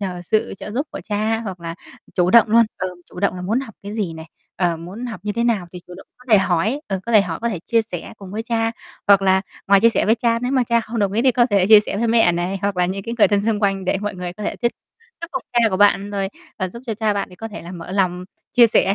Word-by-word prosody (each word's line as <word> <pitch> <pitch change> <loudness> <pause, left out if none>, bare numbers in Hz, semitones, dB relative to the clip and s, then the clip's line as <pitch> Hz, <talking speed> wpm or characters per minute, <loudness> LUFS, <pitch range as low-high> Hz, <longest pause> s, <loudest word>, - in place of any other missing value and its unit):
nhờ 185 -3 -4
sự 215 +5 0
trợ 210 - -7
giúp 275 +8 -2
của - - -7
cha 215 +1 -1
hoặc 190 -6 -6
là 165 0 -5 0.4
chủ 180 -1 +2
động 230 -1 +6
luôn. 230 +2 +6
Ờ, 185 - -2 0.2
chủ 180 - -9
động 200 -2 +1
là 180 - -6
muốn 220 +8 0
học 225 -6 -9
cái 205 +2 -7
gì 200 -7 -2
này, 160 0 -9 0.3
ờ, 175 -2 +1
muốn 185 +9 -7
học 230 -3 -7
như 210 - -2
thế 235 +2 -1
nào 210 -7 +1
thì 180 - -7
chủ 180 - -11
động - - -13
có 250 - -20
thể 210 - +7
hỏi, 190 - +1
ờ, 195 -2 -3
có 235 - -2
thể 215 - +8
hỏi 175 -4 -3
có 235 - +1
thể 195 -7 -3
chia 230 -1 +2
sẻ 180 -6 -7
cùng 195 -2 -10
với 220 +2 -3
cha, 225 -1 0 0.4
hoặc 200 -1 +6
là 190 0 +4 0.3
ngoài 200 0 +5
chia 230 - +6
sẻ - - 0
với 220 - +5
cha 230 -1 +1
nếu 250 +2 -1
mà 260 - +3
cha 235 0 +2
không 225 +1 -5
đồng 200 -2 +1
ý 225 +4 +1
thì 260 - +4
có 240 0 +3
thể 200 -5 +2
chia 215 -1 +8
sẻ 205 - -5
với 230 +3 0
mẹ 225 -6 +4
này, 175 +3 -2
hoặc 200 -1 -1
là 180 -1 +2
những 195 +1 -4
cái 230 +3 -4
người - - +6
thân 205 -1 +2
xung 215 0 0
quanh 195 -2 0
để 185 - 0
mọi 205 -1 -3
người 180 -1 -5
có 210 +4 -9
thể - - -3
thuyết 235 -1 0 0.5
thuyết 335 - -5
phục 260 - -3
cha 240 - +2
của 190 - 0
bạn 200 0 +3
rồi 195 -1 -2 0.3
và 185 - -1
giúp 235 +7 -11
cho 225 - -2
cha 215 0 0
bạn 200 - -2
thì 180 - -14
có 225 - -6
thể 215 - -9
là 175 +2 -9
mở 170 -1 -8
lòng 180 -2 0 0.3
chia 240 -2 +7
sẻ 200 -2 +2
205 Hz, 305 wpm, -20 LUFS, 185-230 Hz, 0.5 s, thể